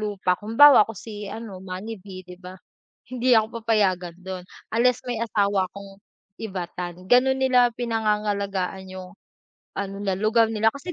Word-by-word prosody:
lupa, 205 -3 -1
halimbawa, 225 +9 +6
ako 225 - -8
si 210 0 -8
ano, 210 -3 -8
Manny 190 +3 -7
V, 185 -1 -10
'di 180 0 -12
ba, 185 0 -10 0.6
hindi 250 -1 +3
ako 220 +1 0
papayagan 190 -6 0
do'n, 185 0 -7 0.3
unless 245 +2 +2
may 245 -3 -3
asawa 200 -4 +1
akong 195 0 -12 0.4
Ivatan. 180 -3 -6
Gano'n 265 +4 +4
nila 250 -2 +4
pinangangalagaan 205 -4 -2
yung 185 -1 -9 0.6
ano, 195 0 -4
na 200 -1 -1
lugar 215 +4 +3
nila, 220 0 +3
kasi, 280 +8 -8
205 Hz, 150 wpm, -24 LUFS, 185-230 Hz, 0.6 s, halimbawa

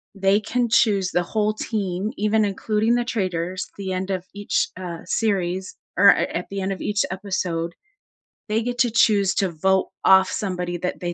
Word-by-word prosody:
they 195 +1 +3
can 240 +3 -1
choose 215 -7 +3
the 175 - +1
whole 215 +4 0
team, 205 -2 -3
even 215 +1 +2
including 215 +3 0
the 240 0 0
traitors, 185 -6 -2
at - - -35
the 195 -2 -4
end 185 +1 -3
of 185 -1 -3
each, 205 0 0
uh, 175 -2 -6
series 190 -4 -1 0.2
or, 200 +2 +8
a - - +5
at 175 - -3
the 195 0 -4
end 190 +1 -2
of 190 - -5
each 205 0 0
episode, 185 -3 -2 0.8
they 220 +2 +1
get 245 +1 -3
to 245 -3 +3
choose 200 -4 +3
to 195 - +1
vote 190 +4 +1 0.2
off 190 0 +6
somebody 180 -3 -3
that 180 +1 -3
they 175 -1 -3
195 Hz, 190 wpm, -23 LUFS, 185-215 Hz, 0.8 s, or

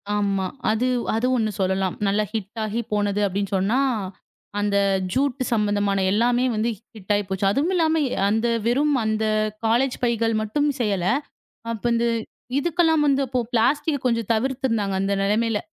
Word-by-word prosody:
ஆமா. 200 -2 0 0.3
அது 230 +4 +1 0.3
அது 230 +3 +1
ஒண்ணு 220 -3 0
சொல்லலாம். 190 0 0
நல்லா 205 +2 +2
ஹிட் 215 0 -5
ஆகி 215 +2 -2
போனது 205 0 0
அப்படின்னு 195 0 -3
சொன்னா, 205 +8 +1 0.8
அந்த 205 -1 +1 0.4
ஜூட் 275 -1 0
சம்பந்தமான 205 -3 +1
எல்லாமே 240 +4 +2
வந்து 220 +2 0 0.3
ஹிட் 210 -1 -5
ஆயிப்போச்சு. 195 -1 -1
அதுவும் 290 - 0
இல்லாம 320 -2 +2
எ - - -8 0.2
அந்த 225 +3 +1 0.2
வெறும் 285 +5 +2
அந்த 220 0 0 0.4
காலேஜ் 245 +4 +2
பைகள் 230 -1 +1
மட்டும் 290 +8 0
செய்யல. 200 -6 0 0.7
அப்ப 225 -3 -6
இந்த 235 0 +1 0.5
இதுக்கெல்லாம் 325 0 +2
வந்து 275 -1 +3
அப்போ 255 0 -1
ப்ளாஸ்டிக் 285 +5 +1
கொஞ்சம் 230 -3 0
தவிர்த்து 265 +4 -1
இருந்தாங்க, 205 -4 0
அந்த 195 +1 0
நிலைமையில. 215 +1 +1
225 Hz, 150 wpm, -23 LUFS, 205-255 Hz, 0.8 s, வந்து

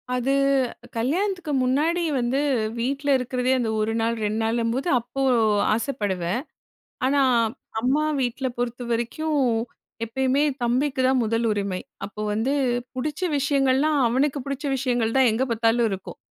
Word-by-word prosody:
அது 250 +2 0 0.7
கல்யாணத்துக்கு 350 - -1
முன்னாடி 310 +7 +1 0.2
வந்து 245 +3 0 0.4
வீட்ல 275 +4 -1
இருக்கிறதே 250 0 -1
அந்த 235 -2 -1
1 215 +1 0
நாள், 230 +1 +1
2 215 +1 -1
நாளும்போது 230 +5 0
அப்போ 245 +3 -6 0.5
ஆசைப்படுவேன். 205 -5 -1 0.6
ஆனா, 280 +2 +3 0.6
அம்மா 265 +6 +1 0.2
வீட்ல 255 +1 -1
பொறுத்தவரைக்கும் 240 +5 -2 0.7
எப்பயுமே 265 +4 +1 0.2
தம்பிக்கு 260 +3 +1
தான் 260 -1 +3
முதல் 230 +1 0
உரிமை. 200 -3 -2 0.3
அப்போ 210 +1 -8
வந்து 225 +6 0 0.4
பிடிச்ச 295 +6 -3 0.2
விஷயங்கள்லாம் 280 +1 +2
அவனுக்கு 270 +4 +1
பிடிச்ச 280 +1 -4
விஷயங்கள் 245 -3 0
தான் 260 -2 +5
எங்க 230 +4 0
பார்த்தாலும் 230 +1 +2
இருக்கும். 190 -1 -6
250 Hz, 120 wpm, -24 LUFS, 230-275 Hz, 0.7 s, தான்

